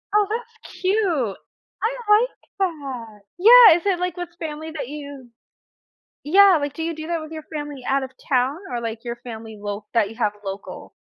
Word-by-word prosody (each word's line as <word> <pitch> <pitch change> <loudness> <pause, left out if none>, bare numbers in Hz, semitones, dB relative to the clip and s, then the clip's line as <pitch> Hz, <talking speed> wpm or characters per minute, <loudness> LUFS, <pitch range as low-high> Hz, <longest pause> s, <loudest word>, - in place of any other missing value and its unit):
Oh, 420 -1 +4
that's 460 +1 -7
cute, 365 - +1 0.5
I 465 +3 +1
like 445 +4 +5 0.3
that 265 - -4 0.2
Yeah, 455 -3 +9
is 350 - -9
it, 380 -3 +1
like, 360 -1 -2
with 355 -1 -5
family 315 0 -5
that 300 -6 -5
you 280 -4 -9 0.9
Yeah, 380 +3 +6
like, 285 -1 -3
do 325 - -5
you 330 0 -2
do 315 0 -7
that 340 -1 -1
with 310 0 -9
your 315 -1 -7
family 290 -3 -5
out 275 0 +1
of 260 - -7 0.2
town 260 +3 +2
or, 240 -1 -2
like, 230 0 -5
your 235 0 -4
family 220 -2 -9
lo 205 0 -5
that 215 -3 +2
you 225 - -11
have 210 -3 +1
local? 195 +1 -7
300 Hz, 190 wpm, -22 LUFS, 240-360 Hz, 0.9 s, Yeah